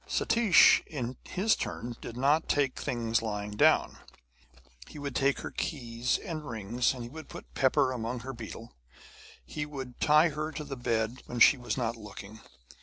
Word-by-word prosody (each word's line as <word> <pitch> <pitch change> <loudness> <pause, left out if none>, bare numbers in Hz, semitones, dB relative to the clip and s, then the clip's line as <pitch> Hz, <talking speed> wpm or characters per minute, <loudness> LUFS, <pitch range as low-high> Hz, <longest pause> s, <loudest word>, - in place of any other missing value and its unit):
Satish 230 -5 +5
in 130 -5 -4
his 210 +4 +2
turn 120 0 -5
did 120 - -8
not 145 +5 +2
take 140 -3 +1
things 115 -2 -1
lying 105 -2 -4
down; 105 - +3 0.9
he - - -11
would 145 -1 -5
take 140 0 +1
her - - -6
keys 120 -4 -2
and 155 -6 -6
rings, 115 +3 0
he 120 -2 -7
would 155 +5 -10
put - - -11
pepper 130 -1 +2
among 120 0 -4
her 135 +2 -6
betel; 115 0 -9 0.7
he 150 - -4
would 135 -4 -8
tie 155 +2 +5
her 155 +1 -4
to 150 - -5
the 140 -2 -6
bed 115 0 -1
when 120 - -5
she 130 - +8
was 125 -1 -4
not 120 -2 -1
looking. 105 -1 -10
125 Hz, 170 wpm, -29 LUFS, 115-150 Hz, 0.9 s, she